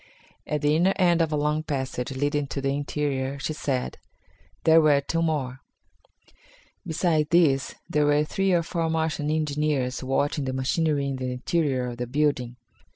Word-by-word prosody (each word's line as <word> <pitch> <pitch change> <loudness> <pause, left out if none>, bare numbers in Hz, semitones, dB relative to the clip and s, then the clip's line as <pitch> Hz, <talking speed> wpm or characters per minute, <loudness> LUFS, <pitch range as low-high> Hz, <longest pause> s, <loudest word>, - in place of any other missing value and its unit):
At 150 -1 -1
the 150 +1 +3
inner 180 +4 +3
end 175 -3 +3
of 160 -1 +1
a - - +1
long 150 +1 0
passage 130 -5 -3
leading 145 +2 -1
to 140 - -4
the 135 0 0
interior, 140 -1 -2
she 140 +3 -3
said, 135 -4 -3 0.6
there 160 0 +6
were 150 -2 +4
two 165 +4 -2
more. 140 -5 -1 1.3
Besides 160 -2 +1
these 150 -6 +3
there 150 -1 +1
were 145 0 +3
three 195 +5 0
or 170 -2 +3
four 165 -1 -2
Martian 160 -2 -1
engineers 150 -4 -1
watching 140 +2 0
the 130 - -2
machinery 140 +2 0
in 135 -1 -2
the 130 -1 -3
interior 135 -1 0
of 120 -1 -5
the 125 0 -3
building. 130 -3 0
145 Hz, 165 wpm, -25 LUFS, 135-160 Hz, 1.3 s, there